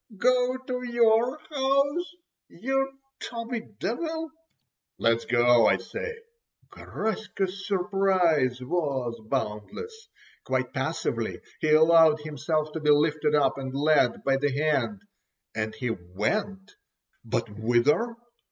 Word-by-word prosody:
go 250 +3 +2
to 255 -1 -5
your 240 +1 +2
house, 280 +5 +1 0.3
you 270 +1 -1 0.3
tubby 230 0 -4 0.2
devil!" 320 - -3 0.7
"Let's 115 0 +1
go, 120 -1 +4
I - - +4
say." 465 -2 -6 0.6
Garaska's 200 -3 -4
surprise 180 -9 +2
was 130 -6 -2
boundless. 445 - -4 0.4
Quite - - -2
passively - - -2 0.2
he 155 - 0
allowed 160 -1 +6
himself 155 +1 -2
to 160 - -4
be 150 -1 0
lifted 150 0 +3
up 140 -2 +2
and 130 0 -5
led 145 -4 +2
by 135 -1 +2
the 145 +1 +1
hand, 155 +8 0 0.5
and 110 0 -3
he 120 +1 -2
went—but 190 - -5
whither? 120 - +2
165 Hz, 105 wpm, -27 LUFS, -, 0.7 s, allowed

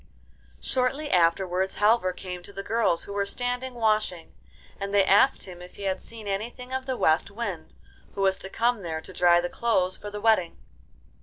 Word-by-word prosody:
Shortly 270 +4 -1
afterwards 180 +2 +2
Halvor 210 -2 +3
came 180 0 -7
to 180 - -10
the 195 0 -6
girls 225 -7 +1
who 200 - -8
were 200 0 0
standing 245 +4 -3
washing, 215 -7 0 0.5
and 200 0 -3
they 200 -1 +5
asked 205 +8 +4
him 180 -2 -10
if 180 - -12
he 200 - -9
had 190 -1 -1
seen 225 -2 -10
anything 240 +6 -4
of 260 0 -3
the 260 -1 -1
West 160 +4 +2
Wind, 200 -7 -5 0.4
who 195 - -3
was 190 -1 +2
to 190 - -7
come 235 +1 +1
there 160 -3 -4
to 185 - -12
dry 175 -1 +5
the 175 - -1
clothes 185 -3 0
for 205 - -7
the 210 0 -6
wedding. 210 -6 +2
200 Hz, 190 wpm, -26 LUFS, 180-235 Hz, 0.5 s, they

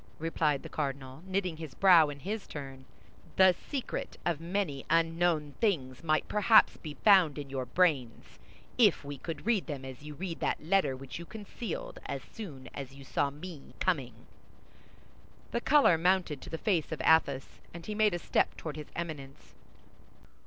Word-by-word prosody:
replied 155 -3 0
the - - -7
cardinal, 135 -1 -4
knitting 185 -3 -1
his 155 -5 -8
brow 175 -6 +6
in 140 -1 -8
his 205 +4 -4
turn, 135 -3 -8 0.5
"the 190 -1 +7
secret 270 - -5
of 165 -3 0
many 170 -6 -2
unknown 165 -2 +2
things 135 - 0
might 155 -1 +1
perhaps 215 +1 +5
be 150 -3 -8
found 185 -8 +6
in 140 -2 -6
your 130 -2 -3
brains, 140 -9 0 0.4
if 205 -10 +4
we 145 0 -5
could 165 +4 -6
read 225 -4 +1
them 140 -4 -5
as 130 -1 -9
you 150 0 -9
read 170 +1 -5
that - - 0
letter 175 -5 +2
which 135 +3 -8
you 170 - -8
concealed 240 - -6
as - - -4
soon 155 - -9
as 135 -1 -7
you 140 - -12
saw 140 +1 0
me 150 +1 -10
coming." 130 -10 -1 1.3
The 235 - -1
color 275 - +5
mounted 175 -5 +1
to - - -9
the 160 - -4
face 175 -5 0
of 160 - -4
Athos, 140 -5 +2
and 170 0 -10
he 215 - -4
made 210 -3 +3
a - - 0
step - - 0
toward 155 -2 -6
his 150 - -8
Eminence. 150 -5 -7
160 Hz, 170 wpm, -30 LUFS, 140-185 Hz, 1.3 s, the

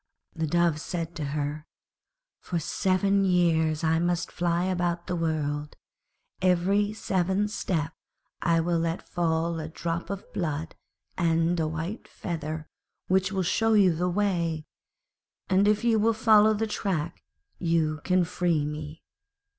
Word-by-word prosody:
The 160 -1 -1
Dove 170 -1 +2
said 170 -1 -4
to 150 - -3
her, 145 +1 -3 0.7
'For 175 - -3
seven 195 +4 +1
years 165 -4 +2
I 160 0 +3
must 175 0 0
fly 175 0 0
about 175 -2 -1
the 180 - -2
world; 150 -3 -2 0.7
every 190 +3 +2
seventh 195 0 0
step 165 -6 -2 0.5
I 165 -1 +3
will 170 0 +1
let 165 +1 -2
fall 165 -1 0
a 155 0 -5
drop 170 +1 -4
of 200 -1 -5
blood 160 -2 -2 0.5
and 165 0 +2
a 160 - +1
white 165 +8 -5
feather 155 -3 -5 0.4
which 190 +1 +2
will 190 -2 0
show 225 +5 +2
you 195 -5 +5
the 180 +3 0
way, 170 -5 0 0.9
and 195 +2 +4
if 210 +1 +2
you 230 -2 +3
will 225 +2 +3
follow 215 -1 +5
the 220 +2 0
track 180 -6 -2 0.4
you 160 -3 +1
can 185 -1 +3
free 165 -3 0
me.' 150 +1 -6
170 Hz, 140 wpm, -27 LUFS, 160-190 Hz, 0.9 s, you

